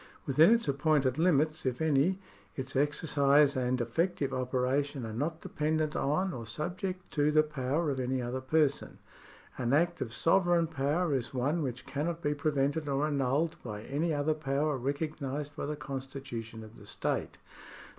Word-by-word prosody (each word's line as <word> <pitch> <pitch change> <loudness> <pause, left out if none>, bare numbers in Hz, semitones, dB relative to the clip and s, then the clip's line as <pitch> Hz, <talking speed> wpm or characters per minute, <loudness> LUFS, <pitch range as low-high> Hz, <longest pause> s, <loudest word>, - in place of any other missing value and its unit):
Within 150 +5 +6
its 230 -6 +3
appointed 140 -1 +2
limits, 155 -2 +2
if 125 -2 -1
any, 160 +4 +2 0.4
its 130 0 -5
exercise 145 0 +3
and 125 0 0
effective 140 +3 -1
operation 130 +1 -1
are 110 - -6
not 155 +8 -2
dependent 155 0 -1
on 175 +7 0
or 115 -3 -6
subject 180 - -4
to 145 -1 +2
the 155 0 +5
power 150 +1 -1
of 135 - -3
any 130 +1 -1
other 125 +1 -3
person. 145 +1 +1 0.6
An 125 0 0
act 170 +4 +2
of 115 - -3
sovereign 170 +6 +3
power 155 +2 0
is 130 -1 -2
one 145 +7 0
which 125 -3 -4
cannot 165 +4 -3
be 145 - +1
prevented 145 +1 0
or 140 +2 +1
annulled 145 +3 0
by 105 -3 -6
any 155 +7 -1
other 150 +1 +1
power 150 0 0
recognised 145 +1 -3
by - - -4
the 150 - -2
constitution 130 -5 -6
of 110 +1 -13
the - - -13
state. - - -2
145 Hz, 160 wpm, -31 LUFS, 130-155 Hz, 0.6 s, Within